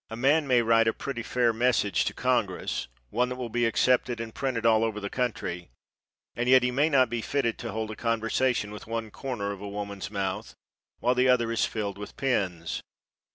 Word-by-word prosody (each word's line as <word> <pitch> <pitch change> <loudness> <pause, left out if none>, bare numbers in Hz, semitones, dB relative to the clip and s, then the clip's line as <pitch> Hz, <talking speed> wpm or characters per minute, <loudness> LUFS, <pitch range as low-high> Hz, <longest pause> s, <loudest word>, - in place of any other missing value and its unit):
A 110 - -5
man 140 +5 +3
may 125 -2 +4
write 115 0 +4
a 110 - +3
pretty 135 -4 -4
fair 120 0 +1
message 115 -3 +2
to - - -1
congress, - - 0 0.2
one 125 +3 +1
that 125 - -3
will 125 -2 -5
be 120 0 +2
accepted 120 +1 +2
and 115 -1 -5
printed 130 -5 -2
all 110 -1 +5
over 110 -2 -1
the 100 -1 -5
country, 95 - -3 0.7
and 120 +2 -1
yet 130 -1 +7
he 125 - +1
may 145 +5 +2
not 130 -4 +4
be 120 0 -3
fitted 120 -2 -1
to 115 - -4
hold 110 +1 -3
a - - -6
conversation 115 0 0
with 105 - -9
one 115 -1 -3
corner 115 -7 -4
of 100 -1 -7
a 100 - -5
woman's 100 -1 -5
mouth 95 -2 -3 0.5
while 125 +1 +3
the 125 +1 +3
other 120 -2 +3
is 115 - +2
filled 100 -3 -4
with 105 - -8
pins. 90 -11 -1
115 Hz, 205 wpm, -27 LUFS, 105-125 Hz, 0.7 s, yet